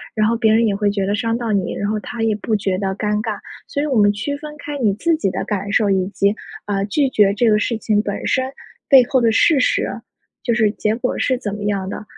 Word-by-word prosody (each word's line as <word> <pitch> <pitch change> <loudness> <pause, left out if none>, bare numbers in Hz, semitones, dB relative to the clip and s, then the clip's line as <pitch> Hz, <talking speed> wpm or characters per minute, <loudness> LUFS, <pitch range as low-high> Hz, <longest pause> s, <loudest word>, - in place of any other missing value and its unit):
然 215 -1 +2
后 230 - +1
别 225 -2 +3
人 230 +1 +4
也 200 - 0
会 205 0 +1
觉 200 -1 -1
得 200 +2 0
伤 230 +2 -1
到 235 -2 -3
你， 195 -3 0
然 205 - -2
后 215 0 -1
他 235 +1 -6
也 220 -1 +1
不 220 - -3
觉 195 -2 -1
得 195 0 -2
尴 210 +1 -1
尬。 - - -4 0.3
所 285 - -2
以 - - 0
我 275 -5 0
们 205 -1 +5
区 220 +8 -3
分 300 0 -9
开 290 0 -6
你 215 -6 +2
自 335 +9 +1
己 250 - 0
的 - - -3
感 200 -1 -3
受， 205 0 +2
以 190 -1 +2
及， 200 +1 +1 0.3
呃， 200 -1 -1
拒 270 +7 +1
绝 205 -5 +3
这 225 +2 +2
个 210 - +4
事 230 +1 -1
情 215 -1 +1
本 200 -2 -4
身 260 0 0 0.4
背 265 -3 +8
后 260 - +3
的 230 -1 +3
事 285 +6 +4
实， 250 - +1 0.5
就 235 - +1
是 220 -2 +3
结 215 0 -1
果 250 +2 -2
是 255 - +1
怎 205 -5 -4
么 205 - -6
样 200 -2 -1
的， 210 - -6
215 Hz, 285 characters per minute, -19 LUFS, 205-240 Hz, 0.5 s, 背